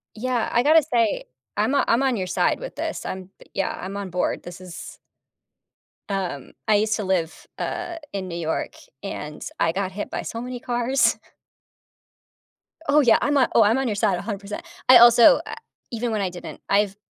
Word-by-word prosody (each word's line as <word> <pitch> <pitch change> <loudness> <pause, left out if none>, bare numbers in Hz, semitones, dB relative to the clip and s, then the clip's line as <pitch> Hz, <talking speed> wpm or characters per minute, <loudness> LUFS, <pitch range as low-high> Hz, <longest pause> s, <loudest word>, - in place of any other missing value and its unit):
Yeah, 245 +1 -1
I 240 - +3
gotta 310 +4 +6
say, 235 -7 0 0.3
I’m 215 +6 +1
o - - +3
I’m 235 +3 +3
on 265 -3 +1
your 185 -3 -2
side - - +1
with - - -8
this. - - -4
I’m 185 0 -6 0.2
yeah, 195 - -1
I’m 190 +2 -6
on 200 -2 -5
board. 180 +1 -1
This 175 0 -10
is 180 -2 -9 1.1
um, 185 -9 -3
I 215 -2 +4
used 215 +1 +1
to 215 - -3
live, 180 -4 -2
uh, 345 - -4 0.2
in 190 -2 -3
New 170 - -5
York, 160 -2 -3 0.3
and 150 -6 -6 0.2
I 165 - +3
got 190 +1 -2
hit 205 +2 -5
by - - -3
so 230 - -5
many 250 +1 -5
cars. 240 -1 +1 1.7
Oh, 295 +1 +5
yeah. 240 -6 +5
I’m 290 0 +1
on 255 - +4
oh, 230 - +6
I’m 220 +4 +4
on 270 - 0
your 215 - -1
side 200 -3 +1
100%. 205 - -5 0.3
I 255 -1 +10
also, 240 - +8
uh, - - -5 0.4
even 235 0 -2
when 215 - 0
I 190 -2 -1
didn’t 170 -4 -9
I’ve 200 0 +2
210 Hz, 190 wpm, -23 LUFS, 185-245 Hz, 1.7 s, I